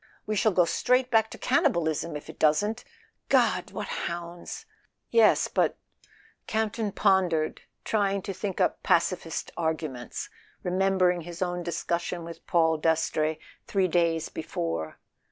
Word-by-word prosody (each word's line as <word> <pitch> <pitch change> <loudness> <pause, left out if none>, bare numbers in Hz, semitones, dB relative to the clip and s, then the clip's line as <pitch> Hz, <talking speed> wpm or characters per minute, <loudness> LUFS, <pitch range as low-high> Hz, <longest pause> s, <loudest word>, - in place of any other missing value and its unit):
We 215 - -1
shall 215 +1 +3
go 180 -2 +4
straight 250 +8 +2
back 220 -1 +4
to - - -9
cannibalism 170 - +1
if 150 - -7
it - - -11
doesn't 205 +9 +2 0.3
— - - -46
God, - - +3
what - - -5 0.2
hounds!" 170 0 -7 0.5
Yes, 225 -2 +5
but—Camp 220 -1 -3
ton 220 -3 -2
pondered, 180 -5 +2 0.2
tried 200 -3 0
to 195 - -4
think 190 0 -4
up - - +1
Pac¬ - - +3
ifist - - -5
arguments, 155 -7 -3 0.4
remembered 185 -1 +2
his 175 +2 -4
own 175 0 -2
discussion 170 0 -2
with 165 0 -10
Paul 160 -2 +3
Dastrey 155 -1 +1 0.3
three 190 -2 +2
days 165 -2 +1
before. 80 - -4
175 Hz, 135 wpm, -27 LUFS, 160-200 Hz, 0.5 s, Yes